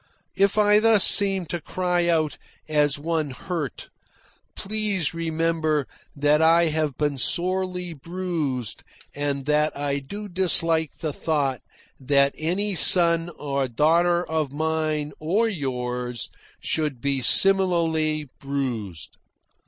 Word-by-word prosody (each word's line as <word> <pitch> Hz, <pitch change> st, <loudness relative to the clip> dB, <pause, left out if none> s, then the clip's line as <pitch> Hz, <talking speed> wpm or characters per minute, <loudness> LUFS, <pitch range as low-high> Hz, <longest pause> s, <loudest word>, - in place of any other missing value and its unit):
If 200 Hz, +2 st, +2 dB
I 210 Hz, 0 st, +5 dB
thus 220 Hz, -2 st, +4 dB
seem 195 Hz, -2 st, +4 dB
to 170 Hz, +2 st, -5 dB
cry 180 Hz, -1 st, -1 dB
out 155 Hz, -4 st, 0 dB, 0.3 s
as 150 Hz, -2 st, +1 dB
one 155 Hz, 0 st, -2 dB
hurt, 150 Hz, -, -6 dB, 0.6 s
please 205 Hz, -7 st, -2 dB
remember 165 Hz, -2 st, -1 dB, 0.3 s
that 145 Hz, +2 st, +2 dB
I 165 Hz, +1 st, +4 dB
have 155 Hz, -3 st, -2 dB
been 145 Hz, -2 st, -1 dB
sorely 180 Hz, +2 st, -2 dB
bruised 160 Hz, -, -4 dB, 0.3 s
and 140 Hz, -1 st, -3 dB
that 150 Hz, 0 st, +1 dB
I 140 Hz, 0 st, -2 dB
do 205 Hz, +10 st, -8 dB
dislike 165 Hz, -4 st, +1 dB
the 155 Hz, -3 st, -2 dB
thought 140 Hz, -5 st, -1 dB, 0.4 s
that 140 Hz, +1 st, +2 dB
any 190 Hz, +6 st, -1 dB
son 170 Hz, 0 st, +5 dB
or 140 Hz, -2 st, -2 dB
daughter 170 Hz, +7 st, +2 dB
of 155 Hz, -3 st, -2 dB
mine 155 Hz, 0 st, -2 dB
or 195 Hz, +9 st, +1 dB
yours 125 Hz, -, -4 dB, 0.3 s
should 150 Hz, -5 st, -2 dB
be 140 Hz, +1 st, -1 dB
similarly 165 Hz, -3 st, +3 dB
bruised. 120 Hz, -, -4 dB
160 Hz, 115 wpm, -24 LUFS, 140-175 Hz, 0.6 s, I